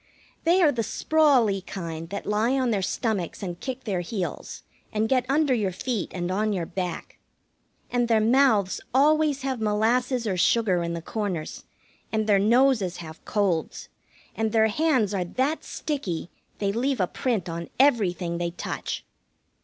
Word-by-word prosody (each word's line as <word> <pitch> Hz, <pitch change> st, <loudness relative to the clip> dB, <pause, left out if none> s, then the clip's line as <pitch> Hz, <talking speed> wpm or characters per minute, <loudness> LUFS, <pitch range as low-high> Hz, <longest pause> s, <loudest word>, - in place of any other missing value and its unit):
They 350 Hz, +3 st, +4 dB
are 300 Hz, -, +5 dB
the 235 Hz, -, -1 dB
sprawly 255 Hz, -7 st, +2 dB
kind 165 Hz, -4 st, -6 dB
that 200 Hz, +1 st, -5 dB
lie 215 Hz, +4 st, +1 dB
on 255 Hz, -2 st, +1 dB
their 200 Hz, -3 st, +1 dB
stomachs 200 Hz, -3 st, -2 dB
and 175 Hz, -2 st, -5 dB
kick 260 Hz, -1 st, -5 dB
their 195 Hz, -5 st, -1 dB
heels, 180 Hz, +1 st, -5 dB, 0.3 s
and 215 Hz, 0 st, 0 dB
get 255 Hz, 0 st, +1 dB
under 285 Hz, -1 st, +3 dB
your 210 Hz, -6 st, 0 dB
feet 220 Hz, +3 st, -3 dB
and 175 Hz, 0 st, -3 dB
on 210 Hz, +2 st, 0 dB
your 180 Hz, -4 st, -2 dB
back. 180 Hz, +1 st, -5 dB, 0.7 s
And 245 Hz, -1 st, +1 dB
their 225 Hz, -2 st, +4 dB
mouths 220 Hz, -4 st, +3 dB
always 295 Hz, 0 st, +3 dB
have 260 Hz, -4 st, -2 dB
molasses 230 Hz, +4 st, +1 dB
or 190 Hz, -4 st, -1 dB
sugar 190 Hz, -2 st, +3 dB
in 170 Hz, 0 st, -2 dB
the 165 Hz, -, -6 dB
corners, 190 Hz, -6 st, -4 dB, 0.5 s
and 220 Hz, -1 st, 0 dB
their 205 Hz, -2 st, +4 dB
noses 220 Hz, -4 st, +3 dB
have 160 Hz, -2 st, -10 dB
colds, 190 Hz, -6 st, -1 dB, 0.5 s
and 220 Hz, -1 st, 0 dB
their 220 Hz, 0 st, +4 dB
hands 255 Hz, -5 st, +1 dB
are 190 Hz, -2 st, 0 dB
that 260 Hz, -, -1 dB
sticky 195 Hz, -, -4 dB, 0.3 s
they 200 Hz, -1 st, 0 dB
leave 250 Hz, +4 st, 0 dB
a 185 Hz, -, +3 dB
print 215 Hz, -1 st, -2 dB
on 170 Hz, 0 st, -5 dB
everything 185 Hz, -10 st, +2 dB
they 170 Hz, 0 st, -1 dB
touch. 170 Hz, -, -5 dB
215 Hz, 160 wpm, -25 LUFS, 185-255 Hz, 0.7 s, are